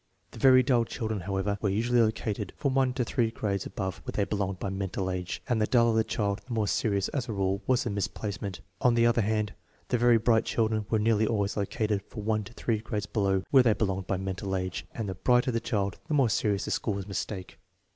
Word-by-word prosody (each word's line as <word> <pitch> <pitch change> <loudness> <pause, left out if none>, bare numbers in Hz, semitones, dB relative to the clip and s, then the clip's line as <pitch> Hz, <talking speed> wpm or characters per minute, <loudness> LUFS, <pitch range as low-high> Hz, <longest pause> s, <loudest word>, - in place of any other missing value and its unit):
The - - -11
very 130 +1 +7
dull 125 -2 +3
children, 110 -2 -3
however, 95 +2 -2
were 105 - +1
usually 120 +4 +2
located 110 -2 -1
from 140 -3 0
one 135 -1 +3
to 125 -1 -1
three 115 -1 +1
grades 100 -3 -2
above 95 -1 -4
where - - -5
they 105 - +1
belonged 100 -2 -2
by 95 - -3
mental 95 -1 -2
age, 90 -1 -4
and 120 -4 +1
the 105 - +2
duller 115 -2 +4
the 110 - +4
child 105 -1 -1
the 125 - -4
more 110 -2 +1
serious, 100 -1 +1
as 130 -4 -3
a - - -1
rule, 95 0 0
was 130 -2 +3
the 120 - -2
misplacement. 100 -1 -4 0.2
On 125 -2 +4
the 115 0 +4
other 120 0 +3
hand, 105 -1 0 0.4
the 125 - +1
very 120 0 +5
bright 115 0 +3
children 110 -2 0
were 110 - +2
'nearly 110 0 +2
always 105 -3 0
located 105 0 -1
from 105 +1 -9
one 110 -1 +1
to 110 - -12
three 115 -2 -1
grades 105 -1 -3
below 100 -3 0
where 135 - +8
they 120 -3 +4
belonged 95 -3 -2
by 95 - 0
mental 95 0 -3
age, 95 -1 -3
and 110 -3 -4
the 95 - -3
brighter 125 +6 +2
the 115 - 0
child 100 -4 -2
the 155 - 0
more 135 -5 +4
serious 100 -1 0
the - - -4
school's 100 -3 -1
mistake. 100 -1 -5
105 Hz, 230 wpm, -28 LUFS, 100-115 Hz, 0.4 s, where